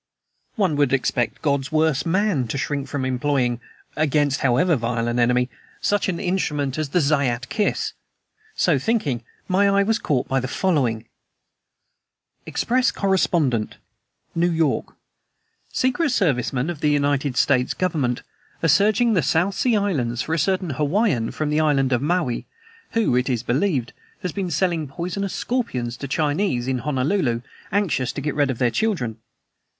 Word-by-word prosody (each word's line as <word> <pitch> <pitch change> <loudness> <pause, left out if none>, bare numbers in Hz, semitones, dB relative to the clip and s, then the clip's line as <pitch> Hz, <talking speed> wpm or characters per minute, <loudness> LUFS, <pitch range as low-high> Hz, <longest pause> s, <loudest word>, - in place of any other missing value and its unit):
One 190 - +1
would 145 -2 +2
expect 125 -2 0
God's 140 0 0
worst 155 0 +1
man 180 - +1
to 125 - -3
shrink 140 +1 -2
from 140 -3 -3
employing 130 -2 0 0.3
against 145 -2 +1
however 135 +7 +3
vile 115 -1 -1
an 120 +1 0
enemy 125 +1 +3 0.3
such 205 -1 +1
an 170 -2 -2
instrument 150 -7 -1
as 155 -2 -2
the 180 - +2
Zayat 140 -5 +1
Kiss. 210 -2 0 0.6
So 160 -6 +2
thinking, 140 - 0 0.2
my 200 +2 +3
eye 200 0 +3
was 225 +3 +1
caught 130 -5 0
by 135 - +1
the 130 - -3
following: 130 - 0 1.4
EXPRESS 255 +1 +1
CORRESPONDENT 165 - +1 0.6
NEW 170 +1 +2
YORK. 160 -2 0 0.8
"Secret 260 +5 +1
service 160 - +1
men 135 +6 -1
of 160 - -8
the 150 - +2
United 145 -2 +1
States 130 -2 +2
Government 150 -9 -1 0.4
are 165 - +3
searching 215 - +4
the 185 - +3
South 165 +7 +1
Sea 245 +2 +1
Islands 140 - 0
for 160 - -3
a 165 - +1
certain 185 +1 0
Hawaiian 150 - +1
from 150 -1 -2
the 150 - +2
island 140 -4 +2
of 125 - +1
Maui, 155 -5 -1 0.5
who, 225 - +2
it 125 +1 +1
is 120 -3 -1
believed, 130 - 0 0.3
has 180 - -2
been 190 -1 -3
selling 165 -1 0
poisonous 180 +7 -4
scorpions 130 - -2
to 140 - -5
Chinese 145 -2 0
in 130 -1 0
Honolulu 135 -2 0 0.3
anxious 180 -11 +1
to 140 - -4
get 150 0 -2
rid 145 -2 +1
of 130 - -2
their 120 -1 +2
children. 160 - -1
145 Hz, 155 wpm, -22 LUFS, 130-185 Hz, 1.4 s, searching